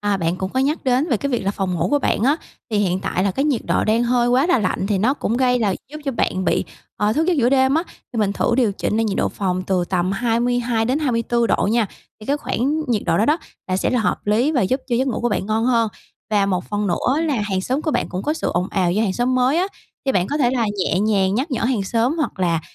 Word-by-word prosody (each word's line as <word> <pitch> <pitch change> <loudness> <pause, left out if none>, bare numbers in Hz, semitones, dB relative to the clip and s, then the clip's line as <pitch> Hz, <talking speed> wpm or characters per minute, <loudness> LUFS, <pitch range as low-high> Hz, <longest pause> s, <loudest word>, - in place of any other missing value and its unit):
à, 205 -1 +1
bạn 170 -1 -1
cũng 190 0 -3
có 260 - +1
nhắc 290 +3 0
đến 260 +5 +2
về 245 - +2
cái 280 +6 -3
việc 245 - 0
là 195 - +1
phòng 190 -3 -2
ngủ 170 +1 0
của 290 - +3
bạn 225 - 0
á, 280 +5 +3 0.3
thì 210 - +1
hiện 190 -2 +1
tại 185 +1 -1
là 200 - +2
cái 270 +10 -1
nhiệt 280 -6 +1
độ - - +1
đang 220 +2 +2
hơi 240 0 +2
quá 255 +5 +3
là 355 -8 +3
lạnh 190 -1 -1
thì 200 -2 0
nó 245 +7 +2
cũng 235 -5 -2
gây 250 -1 +2
là 200 -5 +1 0.2
giúp 305 - -7
cho 275 - -1
bạn 190 -5 -1
bị, - - +1 0.3
ờ, 210 +1 +1
thức 315 +6 +1
giấc 360 - +3
giữa 245 -2 +3
đêm 265 +1 +3
á 325 - +2 0.3
thì 230 - -3
mình 200 -2 +1
thử 235 - 0
điều 230 -6 +2
chỉnh 210 - -2
lại 225 - +2
nhiệt 205 -3 -1
độ - - +2
phòng 185 -2 -2
từ 185 -2 +1
tầm 185 +1 -1
22-24 240 +1 0
độ - - +1
nha, 230 -2 +2 0.3
thì 215 - -11
cái 285 - +1
khoảng 295 +3 -1
nhiệt 225 -4 +1
độ - - +2
đó 215 - +3
đó 300 +3 +3 0.3
là 185 - +1
sẽ - - 0
là 250 - +1
hợp 215 - -1
lý 235 +9 +2
và 260 -8 +2
giúp 260 +8 0
cho 240 - +1
giấc 265 +2 +1
ngủ 240 - -2
của 240 - +1
bạn 205 -3 -2
ngon 220 +1 0
hơn. 235 -2 +2 0.4
Và 200 -2 +2
một 185 -2 -1
phần 205 0 -1
nữa 260 - +1
là 305 -4 0
hàng 195 -2 -1
xóm 260 +9 -2
của 315 - 0
bạn - - -1
cũng 185 +2 -4
có 300 - 0
sự - - -2
ồn 180 +2 0
ào 180 -3 +1
do 210 +4 +1
hàng 195 -4 0
xóm 245 +4 0
mới 255 +4 +2
á, 370 - +2 0.4
thì 265 - +2
bạn 180 -1 +1
có 290 - -2
thể 250 -5 +2
là 245 -3 0
nhẹ 185 0 +1
nhàng 200 -2 +2
nhắc 270 +8 -1
nhở 245 -4 -1
hàng 235 -4 +1
xóm, 235 - 0
hoặc 295 - -2
là 170 -3 +1
230 Hz, 285 wpm, -21 LUFS, 195-260 Hz, 0.4 s, của